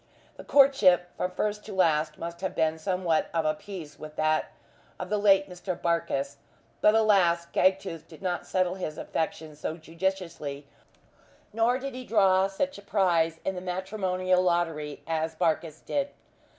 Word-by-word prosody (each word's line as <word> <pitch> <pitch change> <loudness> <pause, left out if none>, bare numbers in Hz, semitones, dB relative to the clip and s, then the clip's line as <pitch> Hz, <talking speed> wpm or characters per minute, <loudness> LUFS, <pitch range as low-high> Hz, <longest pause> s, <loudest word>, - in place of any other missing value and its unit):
The - - -10
courtship, 195 -11 +4
from 180 - -1
first 210 +3 -2
to 215 - -7
last, 155 -4 +2
must 170 +1 -6
have 190 - -3
been 160 0 +1
somewhat 180 -1 0
of 165 -1 +1
a 155 - +3
piece 155 -4 -9
with 155 0 -9
that 155 0 +1 0.5
of - - -5
the 210 - +2
late 195 -1 +5
Mr. 180 0 -5
Barkis. 165 -5 -1 0.4
But 210 - +5
alas! 190 -6 +4
Gagtooth 185 -4 +1
did 160 - -13
not 180 -2 -3
settle 185 -1 +1
his 180 -5 -5
affections 155 -2 -4
so 155 - -3
judiciously, 165 -4 -4 0.9
nor 230 +3 +2
did 270 0 -5
he 255 0 -6
draw 195 -5 +4
such 200 +5 -3
a - - -12
prize 175 -5 +1
in 190 - 0
the 180 - -6
matrimonial 185 0 0
lottery 165 -4 -1
as 160 0 -2
Barkis 160 -2 -1
did. 285 -1 -1
180 Hz, 160 wpm, -28 LUFS, 160-195 Hz, 0.9 s, late